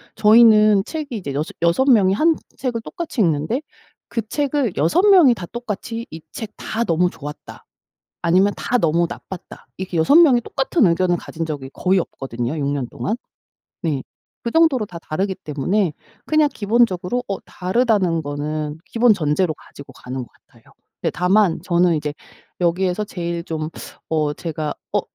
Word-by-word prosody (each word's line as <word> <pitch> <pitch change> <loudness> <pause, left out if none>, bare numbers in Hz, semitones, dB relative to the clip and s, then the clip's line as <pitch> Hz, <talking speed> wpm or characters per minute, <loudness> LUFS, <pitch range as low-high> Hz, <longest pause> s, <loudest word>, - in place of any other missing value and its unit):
저희는 215 -2 +6
책이 300 -5 -5
이제 160 -10 -5
여섯 150 +3 -3
여섯 170 +11 +3
명이 200 -7 +5
1 315 +9 +3 0.2
책을 245 -4 -2
똑같이 320 -4 -4
읽는데 165 - +1 0.5
그 230 -1 -1
책을 285 -5 0
6 165 - +3
명이 350 -11 +7
다 180 - -7
똑같이 230 +1 -5
이 160 0 -8
책 220 -2 -6
다 230 +2 -2
"너무 175 -1 +2
좋았다." 150 -2 -10 0.6
아니면 185 +4 +3
다 245 - 0
"너무 170 -3 +2
나빴다." 190 -3 -10
이렇게 185 -2 -4
6 160 - +4
명이 295 -8 +7
똑같은 270 - +1
의견을 175 +1 +2
가진 165 -1 -5
적이 140 -4 -5
거의 190 0 +2
없거든요 125 -3 -4
6 145 - -1
년 140 -3 -2
동안. 215 - -3 0.7
네 150 -6 -1 0.4
그 235 - -3
정도로 310 -8 +3
다 170 -4 -9
다르기 190 +5 -2
때문에 165 +6 -1 0.3
그냥 310 -1 +3
기본적으로 220 +1 +1
어 195 - -3
다르다는 185 -4 +1
거는 150 +1 -3
기본 230 +4 +4
전제로 155 -1 0
가지고 140 -2 -14
가는 130 0 -7
것 - - -12 0.2
같아요. - - -24 0.4
네 - - +1
다만 180 0 +2
저는 175 -1 +2
이제 150 0 -3 0.5
여기에서 180 +3 +1
제일 170 -3 -4
좀 155 -1 -4 0.4
어 155 -2 0
제가 155 -1 -4 0.2
어 - - +3
185 Hz, 310 characters per minute, -21 LUFS, 160-230 Hz, 0.7 s, 명이